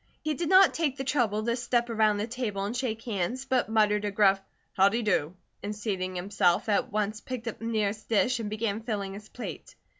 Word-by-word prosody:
He 310 Hz, 0 st, 0 dB
did 325 Hz, +3 st, -2 dB
not 380 Hz, -1 st, +7 dB
take 295 Hz, -5 st, -1 dB
the 270 Hz, -, -3 dB
trouble 235 Hz, -6 st, 0 dB
to 235 Hz, 0 st, +1 dB
step 240 Hz, -1 st, 0 dB
around 215 Hz, -2 st, +2 dB
the 205 Hz, -, -1 dB
table 225 Hz, -5 st, -3 dB
and 215 Hz, +4 st, -3 dB
shake 230 Hz, -3 st, -2 dB
hands, 230 Hz, +4 st, -2 dB
but 260 Hz, -4 st, +1 dB
muttered 210 Hz, -1 st, +3 dB
a 205 Hz, -, 0 dB
gruff 195 Hz, -1 st, +3 dB, 0.3 s
"howdy 200 Hz, +5 st, +3 dB
do?" 180 Hz, -5 st, 0 dB, 0.3 s
and 205 Hz, +1 st, -4 dB
seating 190 Hz, -3 st, -3 dB
himself, 180 Hz, -1 st, +1 dB
at 205 Hz, -, +1 dB
once 215 Hz, +1 st, -1 dB
picked 250 Hz, -2 st, -6 dB
up 230 Hz, -, -4 dB
the 225 Hz, -, -6 dB
nearest 215 Hz, -2 st, -1 dB
dish 235 Hz, +3 st, +2 dB
and 215 Hz, -2 st, -3 dB
began 215 Hz, 0 st, -2 dB
filling 205 Hz, -4 st, -3 dB
his 210 Hz, +2 st, -10 dB
plate. 250 Hz, -, -8 dB
215 Hz, 210 wpm, -28 LUFS, 205-240 Hz, 0.3 s, not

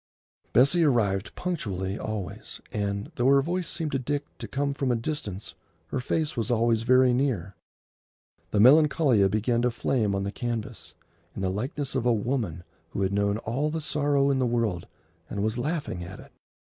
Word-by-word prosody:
Bessie 140 Hz, +8 st, +5 dB
arrived 105 Hz, -9 st, +1 dB
punctually 100 Hz, -, -3 dB
always, 105 Hz, -5 st, -5 dB
and, 100 Hz, +5 st, -2 dB
though 125 Hz, -4 st, +1 dB
her 140 Hz, 0 st, +6 dB
voice 175 Hz, +2 st, -2 dB
seemed 160 Hz, -3 st, -2 dB
to 135 Hz, -, 0 dB
Dick 145 Hz, +3 st, -2 dB
to -, -, -5 dB
come 140 Hz, 0 st, -1 dB
from 135 Hz, -2 st, 0 dB
a -, -, +2 dB
distance, 115 Hz, -, -4 dB, 0.4 s
her 130 Hz, -, -2 dB
face 155 Hz, +4 st, -1 dB
was 115 Hz, -2 st, -1 dB
always 115 Hz, -1 st, +2 dB
very 130 Hz, +1 st, +5 dB
near. 120 Hz, -8 st, 0 dB, 1.0 s
The -, -, -1 dB
Melancolia 135 Hz, -4 st, +5 dB
began 115 Hz, +4 st, +1 dB
to 125 Hz, -, +3 dB
flame 115 Hz, -3 st, 0 dB
on 100 Hz, -, -1 dB
the 100 Hz, -, -2 dB
canvas, 120 Hz, -2 st, -5 dB, 0.4 s
in 95 Hz, -, -4 dB
the 95 Hz, -, +1 dB
likeness 130 Hz, +7 st, -3 dB
of 130 Hz, -2 st, 0 dB
a 120 Hz, -, +5 dB
woman 105 Hz, -, -2 dB, 0.3 s
who 100 Hz, -, -2 dB
had 95 Hz, +1 st, 0 dB
known 100 Hz, 0 st, +1 dB
all 135 Hz, +7 st, 0 dB
the 160 Hz, +1 st, -2 dB
sorrow 145 Hz, -2 st, +1 dB
in 135 Hz, -, +1 dB
the 130 Hz, -, +2 dB
world 115 Hz, -7 st, -1 dB, 0.4 s
and 100 Hz, -1 st, -2 dB
was 110 Hz, +3 st, -1 dB
laughing 145 Hz, -, -2 dB
at 90 Hz, +3 st, -9 dB
it. -, -, -14 dB
120 Hz, 180 wpm, -27 LUFS, 100-140 Hz, 1.0 s, her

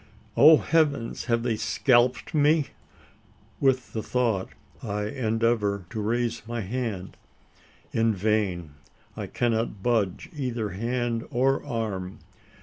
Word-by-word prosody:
Oh 155 Hz, +2 st, +8 dB
Heavens! 145 Hz, -7 st, 0 dB
have 115 Hz, -1 st, +1 dB
they 120 Hz, -2 st, 0 dB
scalped 125 Hz, +5 st, +2 dB
me? 150 Hz, 0 st, +3 dB, 0.9 s
With 130 Hz, -2 st, +1 dB
the 110 Hz, -, -2 dB
thought, 115 Hz, -6 st, 0 dB, 0.3 s
I 105 Hz, -1 st, -3 dB
endeavour 110 Hz, -3 st, 0 dB
to 110 Hz, -2 st, -3 dB
raise 115 Hz, +2 st, -1 dB
my 120 Hz, 0 st, -3 dB
hand. 105 Hz, -3 st, -4 dB, 0.8 s
In 115 Hz, -1 st, +2 dB
vain: 95 Hz, -5 st, 0 dB, 0.4 s
I -, -, -5 dB
cannot 115 Hz, -4 st, -1 dB
budge 110 Hz, -7 st, 0 dB
either 120 Hz, -6 st, -2 dB
hand 120 Hz, +3 st, -2 dB
or 135 Hz, 0 st, +1 dB
arm. 100 Hz, -5 st, -4 dB
115 Hz, 115 wpm, -26 LUFS, 105-125 Hz, 0.9 s, Oh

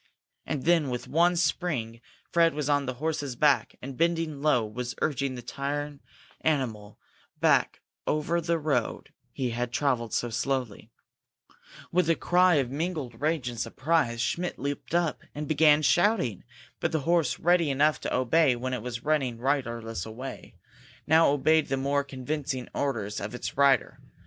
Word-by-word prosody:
And 135 Hz, -, -2 dB
then, 165 Hz, -4 st, +3 dB
with 125 Hz, -1 st, -4 dB
one 175 Hz, +3 st, +3 dB
spring, 130 Hz, -10 st, -1 dB, 0.3 s
Fred 165 Hz, -2 st, +3 dB
was 150 Hz, -2 st, -2 dB
on 145 Hz, -2 st, +1 dB
the 130 Hz, -, -3 dB
horse's 145 Hz, -2 st, -3 dB
back, 145 Hz, +2 st, +2 dB
and, 135 Hz, 0 st, -6 dB
bending 165 Hz, -2 st, 0 dB
low, 135 Hz, -7 st, +3 dB
was 120 Hz, +3 st, -5 dB
urging 140 Hz, -3 st, -1 dB
the 120 Hz, -, -8 dB
tired 145 Hz, +2 st, -4 dB, 0.4 s
animal 115 Hz, -9 st, -1 dB, 0.4 s
back -, -, +2 dB, 0.3 s
over 155 Hz, +3 st, 0 dB
the 170 Hz, 0 st, 0 dB
road 145 Hz, -7 st, -2 dB, 0.2 s
he 125 Hz, -2 st, -2 dB
had 120 Hz, +1 st, -2 dB
travelled 120 Hz, -4 st, 0 dB
so 120 Hz, -, -1 dB
slowly. 125 Hz, -1 st, -2 dB, 1.0 s
With 180 Hz, -1 st, +2 dB
a 165 Hz, -, +4 dB
cry 180 Hz, +1 st, +3 dB
of 135 Hz, -4 st, 0 dB
mingled 145 Hz, -6 st, -4 dB
rage 155 Hz, -4 st, 0 dB
and 120 Hz, -2 st, -5 dB
surprise 135 Hz, -3 st, 0 dB
Schmidt 175 Hz, +8 st, -2 dB
leaped 140 Hz, +4 st, -4 dB
up 170 Hz, -3 st, 0 dB
and 150 Hz, 0 st, -4 dB
began 155 Hz, 0 st, +4 dB
shouting. 175 Hz, -, +2 dB, 0.3 s
But -, -, -1 dB
the 160 Hz, -, 0 dB
horse, 170 Hz, 0 st, +1 dB
ready 175 Hz, -2 st, +3 dB
enough 150 Hz, +3 st, +2 dB
to -, -, -3 dB
obey 130 Hz, +2 st, +3 dB
when 130 Hz, +2 st, -4 dB
it 125 Hz, -, -2 dB
was 120 Hz, 0 st, -5 dB
running 140 Hz, -6 st, 0 dB
riderless 120 Hz, -6 st, -2 dB
away, 120 Hz, +5 st, -8 dB, 0.5 s
now 160 Hz, +2 st, +5 dB
obeyed 155 Hz, +2 st, +3 dB
the 135 Hz, -, -1 dB
more 140 Hz, +1 st, 0 dB
convincing 135 Hz, -1 st, -4 dB
orders 110 Hz, -8 st, -2 dB
of 105 Hz, +4 st, -5 dB
its -, -, -5 dB
rider. 140 Hz, -1 st, +3 dB
140 Hz, 160 wpm, -27 LUFS, 125-160 Hz, 1.0 s, now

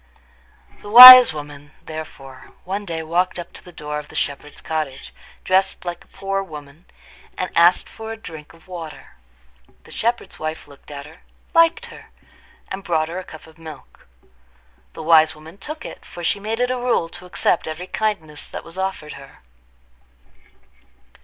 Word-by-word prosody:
The 205 Hz, -, -11 dB
wise 250 Hz, +1 st, +12 dB
woman, 145 Hz, -1 st, -10 dB
therefore, 135 Hz, -4 st, -11 dB
one 200 Hz, +3 st, -5 dB
day 165 Hz, -3 st, -5 dB
walked 175 Hz, +4 st, -1 dB
up 175 Hz, -1 st, -9 dB
to -, -, -12 dB
the 180 Hz, -, -14 dB
door 150 Hz, -2 st, -6 dB
of 150 Hz, -, -11 dB
the -, -, -15 dB
shepherd's 145 Hz, +1 st, -5 dB
cottage, 155 Hz, -4 st, -5 dB, 0.3 s
dressed 190 Hz, 0 st, 0 dB
like 175 Hz, -1 st, -6 dB
a -, -, -30 dB
poor 195 Hz, 0 st, -4 dB
woman, 150 Hz, -2 st, -12 dB, 0.5 s
and 185 Hz, -, -4 dB
asked 170 Hz, +2 st, +4 dB
for 225 Hz, 0 st, -10 dB
a 225 Hz, -, -7 dB
drink 160 Hz, -8 st, -12 dB
of 165 Hz, +2 st, -22 dB
water. 170 Hz, -4 st, -10 dB, 0.7 s
The -, -, -17 dB
shepherd's 235 Hz, +1 st, -3 dB
wife 155 Hz, -1 st, -6 dB
looked 140 Hz, -1 st, -18 dB
at 140 Hz, -1 st, -9 dB
her, 160 Hz, +3 st, -16 dB, 0.3 s
liked 330 Hz, +8 st, +3 dB
her, -, -, -15 dB, 0.6 s
and 190 Hz, +1 st, -7 dB
brought 160 Hz, -3 st, -1 dB
her 175 Hz, +2 st, -5 dB
a -, -, -8 dB
cup 160 Hz, -3 st, -13 dB
of 160 Hz, 0 st, -20 dB
milk. 160 Hz, -3 st, -14 dB, 0.9 s
The -, -, -9 dB
wise 160 Hz, -1 st, +4 dB
woman 160 Hz, +5 st, -15 dB
took 305 Hz, +9 st, -8 dB
it, -, -, -10 dB
for 175 Hz, -, -11 dB
she 200 Hz, -, 0 dB
made 220 Hz, +3 st, -4 dB
it 250 Hz, 0 st, 0 dB
a 255 Hz, -, -2 dB
rule 245 Hz, -9 st, 0 dB
to 175 Hz, +1 st, -10 dB
accept 175 Hz, -, -1 dB
every 160 Hz, +3 st, -6 dB
kindness 185 Hz, -8 st, -3 dB
that -, -, -8 dB
was 165 Hz, +3 st, -11 dB
offered 190 Hz, -5 st, -4 dB
her. 135 Hz, 0 st, -15 dB
170 Hz, 170 wpm, -20 LUFS, 155-195 Hz, 0.9 s, wise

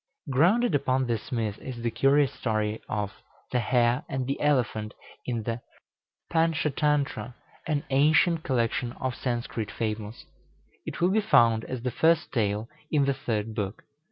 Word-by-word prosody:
Grounded 180 Hz, -, +3 dB
upon 130 Hz, -2 st, +2 dB
this 115 Hz, -3 st, -3 dB
myth 110 Hz, -4 st, -2 dB
is 120 Hz, -3 st, -7 dB
the 115 Hz, -, 0 dB
curious 135 Hz, +4 st, +3 dB
story 110 Hz, -2 st, -1 dB
of 105 Hz, -2 st, -2 dB, 0.4 s
"The 125 Hz, -, +2 dB
Hare 120 Hz, +2 st, +2 dB
and 130 Hz, -1 st, -2 dB
the 135 Hz, +2 st, -3 dB
Elephant," 120 Hz, -7 st, +1 dB, 0.3 s
in 120 Hz, -3 st, -1 dB
the 115 Hz, +2 st, -3 dB, 0.7 s
"Pantschatantra," 150 Hz, -6 st, +1 dB, 0.3 s
an 150 Hz, -3 st, 0 dB
ancient 155 Hz, +4 st, +4 dB
collection 120 Hz, -3 st, 0 dB
of 130 Hz, -1 st, -3 dB
Sanskrit 120 Hz, -4 st, -3 dB
fables. 110 Hz, 0 st, -4 dB, 0.6 s
It -, -, -5 dB
will 180 Hz, +2 st, +4 dB
be 215 Hz, +2 st, +3 dB
found 115 Hz, -, +4 dB
as 130 Hz, -2 st, -5 dB
the 125 Hz, -, -1 dB
first 165 Hz, +5 st, +2 dB
tale 105 Hz, -2 st, 0 dB, 0.2 s
in 145 Hz, -3 st, +3 dB
the 140 Hz, -, +2 dB
third 110 Hz, -4 st, -3 dB
book. 105 Hz, -1 st, -4 dB
125 Hz, 150 wpm, -27 LUFS, 110-145 Hz, 0.7 s, ancient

